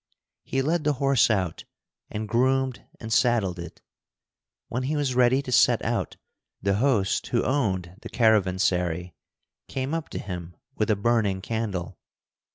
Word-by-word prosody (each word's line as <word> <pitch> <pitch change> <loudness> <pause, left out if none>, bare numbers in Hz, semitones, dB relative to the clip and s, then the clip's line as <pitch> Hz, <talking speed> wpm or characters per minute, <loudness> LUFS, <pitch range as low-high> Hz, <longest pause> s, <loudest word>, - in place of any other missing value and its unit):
He 135 0 -1
led 160 +3 0
the 150 -1 +2
horse 135 -3 +3
out 95 -6 -1 0.4
and 110 0 -4
groomed 130 +2 +1 0.2
and 110 0 -4
saddled 110 -8 +2
it. 85 -1 -9 0.8
When 125 - -3
he 140 +4 -1
was 145 -3 0
ready 125 +2 +3
to 130 - -6
set - - +5
out, - - -2 0.4
the 100 0 +1
host 110 -6 +1
who 120 - +1
owned 95 -10 -1
the - - -8
caravansary 90 -5 +1 0.5
came 135 +3 -3
up 165 -1 -3
to - - -6
him 90 -3 -6 0.2
with 110 - 0
a 110 - +4
burning 100 -2 +1
candle. 95 -5 -4
110 Hz, 150 wpm, -26 LUFS, 95-130 Hz, 0.8 s, set